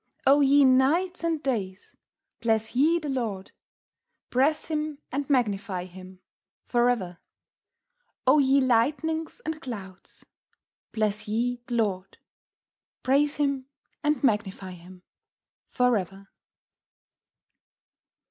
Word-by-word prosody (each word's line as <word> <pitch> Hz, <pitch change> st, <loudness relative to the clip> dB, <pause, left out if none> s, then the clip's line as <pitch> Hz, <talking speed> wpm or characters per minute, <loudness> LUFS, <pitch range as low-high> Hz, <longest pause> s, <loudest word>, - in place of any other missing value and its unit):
O 280 Hz, +2 st, +6 dB
ye 280 Hz, 0 st, +5 dB
Nights 310 Hz, +8 st, +2 dB
and 325 Hz, -2 st, -1 dB
Days, 200 Hz, -8 st, -3 dB, 0.4 s
Bless 225 Hz, 0 st, 0 dB
ye 310 Hz, +6 st, +4 dB
the 310 Hz, -3 st, -5 dB
Lord; 225 Hz, -8 st, -3 dB, 0.8 s
Praise 275 Hz, +5 st, +2 dB
Him, 305 Hz, -2 st, -3 dB
and 280 Hz, +1 st, -3 dB
Magnify 200 Hz, -8 st, 0 dB
Him 185 Hz, 0 st, -13 dB, 0.4 s
for 240 Hz, 0 st, +2 dB
ever. 185 Hz, -8 st, -2 dB, 1.1 s
O 265 Hz, +4 st, +5 dB
ye 275 Hz, 0 st, +4 dB
Lightnings 295 Hz, +6 st, 0 dB
and 320 Hz, 0 st, -4 dB
Clouds, 195 Hz, -, -9 dB, 0.7 s
Bless 215 Hz, -1 st, -1 dB
ye 240 Hz, +3 st, -1 dB
the 240 Hz, -, -3 dB
Lord; 195 Hz, -4 st, -1 dB, 0.9 s
Praise 285 Hz, +3 st, +2 dB
Him, 280 Hz, -3 st, -1 dB, 0.4 s
and 300 Hz, -1 st, 0 dB
Magnify 200 Hz, -5 st, 0 dB
Him 180 Hz, +1 st, -14 dB, 0.7 s
for 250 Hz, -1 st, +2 dB
ever." 195 Hz, 0 st, -5 dB
245 Hz, 105 wpm, -26 LUFS, 200-285 Hz, 1.1 s, O